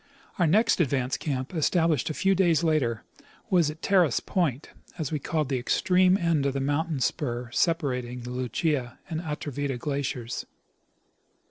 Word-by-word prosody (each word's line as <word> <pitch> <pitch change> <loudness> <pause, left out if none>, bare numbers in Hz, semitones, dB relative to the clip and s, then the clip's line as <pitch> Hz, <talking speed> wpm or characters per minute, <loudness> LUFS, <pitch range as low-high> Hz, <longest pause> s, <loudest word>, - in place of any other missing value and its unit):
105 - - -3
Our 170 - +5
next 215 -1 +4
advance 130 -4 0
camp, 130 0 -3
established 165 -3 +1
a 155 - -3
few 195 0 +2
days 175 -4 +3
later, 135 -9 +1 0.5
was 175 -5 +4
at 155 +1 -9
Terrace 180 -9 +3
point, 155 -7 -1 0.3
as' 155 -4 -3
we 155 - -1
called 155 +1 -1
the 130 -2 -1
extreme 185 +8 +3
end 165 -6 +1
of 135 - -1
the 135 - -1
mountain 145 +2 -1
spur 120 -3 -2
separating 125 -6 0
the 120 +1 -7
Lucia 125 +1 -1
and 160 0 -2
Atrevida 145 -4 -3
glaciers. 130 -3 -3
150 Hz, 155 wpm, -27 LUFS, 130-170 Hz, 0.5 s, Our